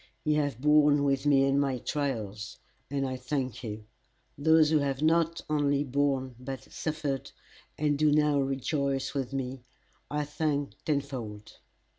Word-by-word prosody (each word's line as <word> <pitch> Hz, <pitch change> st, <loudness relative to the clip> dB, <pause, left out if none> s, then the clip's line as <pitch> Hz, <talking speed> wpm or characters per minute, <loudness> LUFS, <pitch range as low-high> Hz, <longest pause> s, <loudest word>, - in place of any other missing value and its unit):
Ye 150 Hz, -, +2 dB
have 145 Hz, -5 st, 0 dB
borne 150 Hz, 0 st, +5 dB
with 135 Hz, 0 st, +1 dB
me 135 Hz, -2 st, +5 dB
in 135 Hz, +1 st, +2 dB
my 135 Hz, -2 st, +1 dB
trials, 110 Hz, -7 st, -3 dB, 0.3 s
and 135 Hz, -1 st, -1 dB
I 130 Hz, 0 st, -3 dB
thank 130 Hz, -2 st, -3 dB
you. 105 Hz, -1 st, -6 dB, 0.5 s
Those 160 Hz, +1 st, +4 dB
who 155 Hz, -, +4 dB
have 140 Hz, 0 st, -1 dB
not 165 Hz, +1 st, +2 dB
only 145 Hz, -2 st, +2 dB
borne 135 Hz, -1 st, 0 dB
but 130 Hz, +1 st, -6 dB
suffered, 150 Hz, -4 st, -3 dB, 0.5 s
and 145 Hz, -1 st, +1 dB
do 155 Hz, -1 st, +4 dB
now 150 Hz, -1 st, +3 dB
rejoice 135 Hz, 0 st, -1 dB
with 135 Hz, -3 st, -2 dB
me, 130 Hz, -2 st, -4 dB, 0.5 s
I 150 Hz, 0 st, -1 dB
thank 145 Hz, -1 st, -1 dB
tenfold. 130 Hz, -8 st, -4 dB
140 Hz, 145 wpm, -29 LUFS, 130-150 Hz, 0.5 s, borne